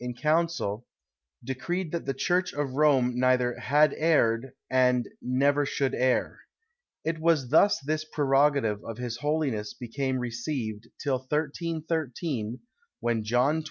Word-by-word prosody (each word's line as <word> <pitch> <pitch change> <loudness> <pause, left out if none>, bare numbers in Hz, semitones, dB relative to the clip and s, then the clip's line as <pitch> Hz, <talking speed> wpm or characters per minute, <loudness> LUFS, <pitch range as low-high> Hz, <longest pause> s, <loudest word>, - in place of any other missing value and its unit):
in 125 0 -5
council, 155 -7 0 0.6
decreed 160 +7 -3
that 170 - -3
the 135 - 0
church 180 +6 0
of 145 -2 -2
Rome 135 -4 +3
neither 125 -1 +2
had 150 +1 +3
erred, 135 -6 +2 0.2
and 125 -1 +2
never 140 +3 +2
should 140 -1 -1
err. 130 0 +1 0.7
It 165 0 -1
was 160 -6 +2
thus 200 +8 +5
this 155 +3 -2
prerogative 140 -7 +2
of 115 - -7
his 120 -1 -4
holiness 135 -7 -1
became 130 +2 -2
received, 120 -2 -4
till 135 -3 0
1313, 150 -4 -3 0.4
when 115 -2 0
John 125 +7 +2
XXII. - - 0
135 Hz, 130 wpm, -27 LUFS, 125-155 Hz, 0.7 s, thus